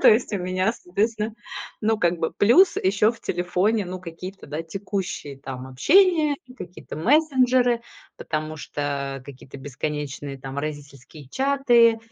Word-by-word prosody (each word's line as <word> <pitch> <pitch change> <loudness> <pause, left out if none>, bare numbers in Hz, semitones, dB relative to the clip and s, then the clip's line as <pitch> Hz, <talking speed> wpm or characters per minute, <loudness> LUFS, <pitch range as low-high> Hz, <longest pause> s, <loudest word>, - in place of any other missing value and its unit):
То - - +8
есть 225 +2 +4
у 205 - 0
меня, 185 +3 0
соответственно, 215 +2 -2 0.5
ну, 220 0 +2
как 175 -3 +1
бы 160 - -1
плюс 345 - +5
еще 205 +3 +3
в 230 - -16
телефоне, 185 +4 0
ну, 185 0 -6
какие-то, 185 +2 -9
да, 150 +3 -4
текущие 185 -5 -5
там 130 -1 -7
общения 305 - +4
и 255 - -14
какие-то 180 - -9
мессенджеры. 255 - +3 0.4
Потому 155 0 -4
что 140 -2 -4
какие-то 140 0 -11
бесконечные 145 0 -5
там 135 +1 -6
родительские 145 -1 -7
чаты, 245 - +4
185 Hz, 140 wpm, -24 LUFS, 145-230 Hz, 0.5 s, То